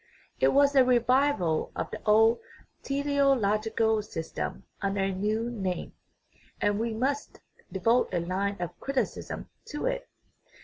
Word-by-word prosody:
It - - +4
was 280 +1 +4
a 265 - +8
revival 250 - +2
of - - -3
the - - -6
old 225 +2 +5 0.4
teleological 230 -6 +1
system 165 -6 -5 0.2
under 195 0 0
a 195 0 +1
new 215 +5 -1
name, 190 -6 -3 0.7
and 205 0 +1
we 230 +1 -1
must 270 +6 -2 0.3
devote 230 +6 +2
a 180 - 0
line 190 +4 -1
of 175 0 -5
criticism 275 -1 -3 0.2
to 295 - -5
it. - - -2
225 Hz, 130 wpm, -28 LUFS, 200-275 Hz, 0.7 s, a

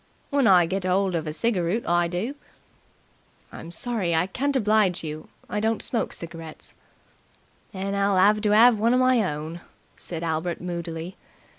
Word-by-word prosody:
"When 280 -4 +3
I 180 -3 +6
get 190 +3 -3
'old 185 +1 +1
of 165 -2 -2
a - - -1
cigaroot 195 +3 -1
I 175 0 +2
do." 180 +10 -3 1.2
"I'm 165 - -9
sorry 195 -4 -2
I 165 +2 +2
can't 275 +9 -2
oblige 210 -7 +2
you. 155 0 -6 0.2
I 210 - -2
don't 220 0 0
smoke 230 - 0
cigarettes." 165 -2 -7 1.0
"Then 195 +1 -4
I'll 200 -1 +1
'ave 210 +3 +4
to 210 -1 +1
'ave 225 +2 +6
one 230 +3 +3
of - - +3
my 255 -2 +4
own," 155 +3 -6 0.3
said 170 -1 -6
Albert 165 +1 -2
moodily. 170 0 -5
185 Hz, 160 wpm, -25 LUFS, 170-220 Hz, 1.2 s, I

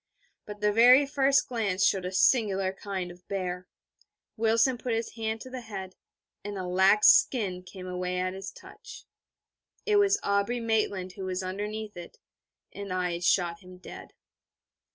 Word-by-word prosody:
But 210 0 -9
the 210 0 +2
very 250 +5 +7
first 275 0 +2
near - - -23
glance 195 -3 +1
showed 190 -2 +1
a 180 - -3
singular 195 -2 +2
kind 190 -2 -5
of 175 0 -17
bear. 185 -2 -4 0.7
Wilson 230 +3 +2
put 240 -3 -2
his 225 0 -3
hand 220 -1 -4
to 255 - -10
the 255 -1 -6
head, 195 -5 -8 0.5
and 205 0 -6
a 185 - -4
lax 190 +4 +4
skin 195 -8 +3
came 185 0 -11
away 180 0 -3
at 185 0 -2
his 195 0 -7
touch.... - - -13 0.8
It 425 -1 +3
was 405 0 +3
Aubrey 200 +4 0
Maitland 215 -5 -1
who 190 +1 -8
was 185 0 -3
underneath 210 +3 -5
it, 175 -1 -10 0.6
and 200 -1 -7
I 180 -1 -1
had 170 +1 -5
shot 175 -1 +1
him 185 -1 -14
dead. 180 - -12
200 Hz, 170 wpm, -28 LUFS, 185-225 Hz, 0.8 s, very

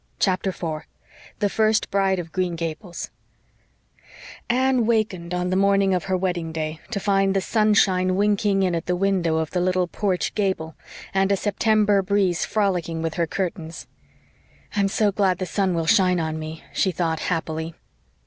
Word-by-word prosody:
CHAPTER 190 0 +1
4 160 -4 -5 0.5
THE 205 - +1
FIRST 220 +1 +1
BRIDE 195 -1 +2
OF 170 -2 -6
GREEN 180 -1 -1
GABLES 165 +2 -5 1.4
Anne 255 -1 +2
wakened 205 -7 0
on 180 0 -1
the - - +1
morning 195 0 +3
of 180 -3 -1
her 190 -1 0
wedding 175 -3 -2
day 155 0 -4
to 200 - -2
find 195 -1 +2
the - - +4
sunshine 190 -3 +2
winking 205 0 +2
in 185 -2 +1
at 165 -1 -3
the 180 - +1
window 180 -4 +1
of 160 -1 -2
the 180 - 0
little 185 0 +1
porch 185 0 -1
gable 190 -6 -1 0.4
and 195 0 +2
a 200 - +3
September 210 0 +2
breeze 190 -3 +1
frolicking 180 -6 -1
with 165 -1 -2
her 170 -1 0
curtains. 170 -2 -4 0.9
"I'm 200 -1 +2
so 205 +1 +1
glad 190 -2 +1
the 185 - -3
sun 190 -1 0
will 165 -1 -1
shine 180 +1 +4
on 160 -1 -2
me," 155 +1 -7
she 190 - +1
thought 165 -2 -1
happily. 160 -1 -3
185 Hz, 170 wpm, -23 LUFS, 170-200 Hz, 1.4 s, the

